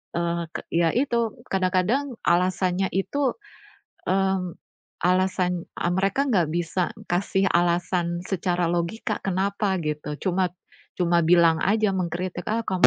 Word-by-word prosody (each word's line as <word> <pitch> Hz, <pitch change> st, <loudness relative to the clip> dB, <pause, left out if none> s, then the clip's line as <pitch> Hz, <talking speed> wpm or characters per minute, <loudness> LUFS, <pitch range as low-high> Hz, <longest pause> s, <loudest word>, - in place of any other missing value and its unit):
eee, 170 Hz, 0 st, 0 dB
ke -, -, -5 dB
ya 165 Hz, -1 st, +2 dB
itu, 235 Hz, -4 st, +1 dB, 0.2 s
kadang-kadang 190 Hz, +9 st, +1 dB
alasannya 185 Hz, +1 st, +2 dB
itu, 265 Hz, +8 st, 0 dB, 0.8 s
mmm, 190 Hz, -2 st, +1 dB, 0.5 s
alasan, 180 Hz, -1 st, +1 dB
eee, 175 Hz, -, 0 dB
mereka 195 Hz, +7 st, +1 dB
ga 180 Hz, -5 st, +4 dB
bisa 170 Hz, +2 st, -1 dB, 0.3 s
kasih 190 Hz, +2 st, +1 dB
alasan 175 Hz, 0 st, +1 dB
secara 180 Hz, -2 st, -1 dB
logika 175 Hz, +6 st, -2 dB
kenapa 195 Hz, +1 st, 0 dB
gitu, 150 Hz, -1 st, -3 dB
cuma 185 Hz, 0 st, +1 dB, 0.5 s
cuma 175 Hz, -1 st, +3 dB
bilang 165 Hz, -1 st, +5 dB
aja, 210 Hz, +1 st, +2 dB
mengkritik 180 Hz, 0 st, -3 dB
ah 230 Hz, +2 st, 0 dB
kamu 185 Hz, -3 st, +4 dB
185 Hz, 120 wpm, -25 LUFS, 175-195 Hz, 0.8 s, bilang